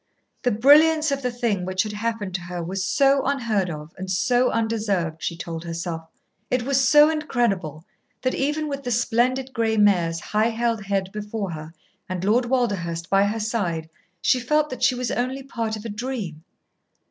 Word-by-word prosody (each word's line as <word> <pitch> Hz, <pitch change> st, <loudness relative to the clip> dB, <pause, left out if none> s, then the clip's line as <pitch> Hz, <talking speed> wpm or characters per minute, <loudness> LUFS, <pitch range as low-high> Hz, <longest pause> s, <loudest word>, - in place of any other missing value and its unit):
The 245 Hz, -, +2 dB
brilliance 305 Hz, +7 st, +5 dB
of 275 Hz, 0 st, -1 dB
the 250 Hz, -, 0 dB
thing 235 Hz, -6 st, -1 dB
which 185 Hz, +1 st, 0 dB
had 215 Hz, -, -5 dB
happened 210 Hz, -2 st, -3 dB
to 180 Hz, -, -2 dB
her 175 Hz, 0 st, -5 dB
was 185 Hz, +3 st, -3 dB
so 275 Hz, +7 st, +3 dB
unheard 230 Hz, -9 st, 0 dB
of 150 Hz, 0 st, -7 dB
and 190 Hz, 0 st, -5 dB
so 245 Hz, +6 st, +2 dB
undeserved, 205 Hz, -8 st, -1 dB
she 170 Hz, -, -3 dB
told 165 Hz, -1 st, -6 dB
herself. 165 Hz, -1 st, -5 dB, 0.4 s
It 250 Hz, -1 st, +1 dB
was 270 Hz, +1 st, +2 dB
so 295 Hz, +4 st, +6 dB
incredible 200 Hz, -, -1 dB, 0.4 s
that, 255 Hz, -, +1 dB
even 300 Hz, +3 st, -1 dB
with 280 Hz, -1 st, -4 dB
the 250 Hz, -, -4 dB
splendid 245 Hz, +3 st, +1 dB
gray 225 Hz, -1 st, +1 dB
mare's 175 Hz, -5 st, +3 dB
high 215 Hz, +5 st, +1 dB
held 230 Hz, -2 st, -1 dB
head 195 Hz, -1 st, -1 dB
before 210 Hz, -2 st, -4 dB
her 155 Hz, 0 st, -7 dB, 0.4 s
and 185 Hz, -1 st, -3 dB
Lord 230 Hz, +5 st, +3 dB
Walderhurst 195 Hz, -10 st, -1 dB
by 195 Hz, +1 st, +5 dB
her 215 Hz, +2 st, -1 dB
side, 180 Hz, -8 st, -2 dB, 0.3 s
she 255 Hz, -, +3 dB
felt 300 Hz, +4 st, +1 dB
that 255 Hz, -, -6 dB
she 255 Hz, 0 st, +4 dB
was 250 Hz, -1 st, -2 dB
only 255 Hz, +3 st, -2 dB
part 230 Hz, -5 st, -3 dB
of 215 Hz, +1 st, -9 dB
a -, -, -3 dB
dream. 210 Hz, -8 st, -5 dB
220 Hz, 180 wpm, -23 LUFS, 185-255 Hz, 0.4 s, so